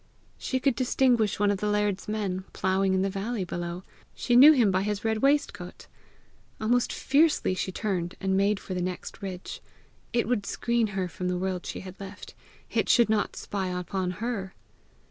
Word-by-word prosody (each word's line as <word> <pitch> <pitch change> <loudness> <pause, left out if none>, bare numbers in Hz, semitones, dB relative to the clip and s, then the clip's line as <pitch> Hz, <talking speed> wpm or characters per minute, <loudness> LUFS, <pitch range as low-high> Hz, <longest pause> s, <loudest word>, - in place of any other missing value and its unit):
She 260 - -1
could 270 0 +2
distinguish 245 -4 +2
one 205 0 +3
of 200 - -2
the 210 - -1
laird's 210 -1 0
men, 200 -3 -2
ploughing 190 0 +1
in 190 - +2
the 195 - 0
valley 205 +2 -3
below: 175 0 -5 0.3
she 245 - 0
knew 275 +5 +10
him 240 -9 +4
by 185 0 +1
his 205 +1 -2
red 220 -1 +1
waistcoat! 275 -9 0 0.7
Almost 240 +3 +1
fiercely 295 - +2
she 185 +1 -2
turned 180 -3 -2
and 190 0 0
made 200 +1 +2
for 190 - -6
the 180 - -2
next 180 0 -5
ridge: 185 -2 -6 0.5
it 235 -3 +1
would 225 -5 0
screen 235 -1 0
her 185 -1 0
from 180 +1 -5
the 180 0 0
world 185 -1 -3
she - - -5
had 185 0 -10
left; 195 0 -9 0.4
it - - 0
should 235 -3 +5
not 215 -1 0
spy 195 -2 -3
upon 185 +1 -2
her! 210 -5 -4
200 Hz, 185 wpm, -27 LUFS, 185-230 Hz, 0.7 s, knew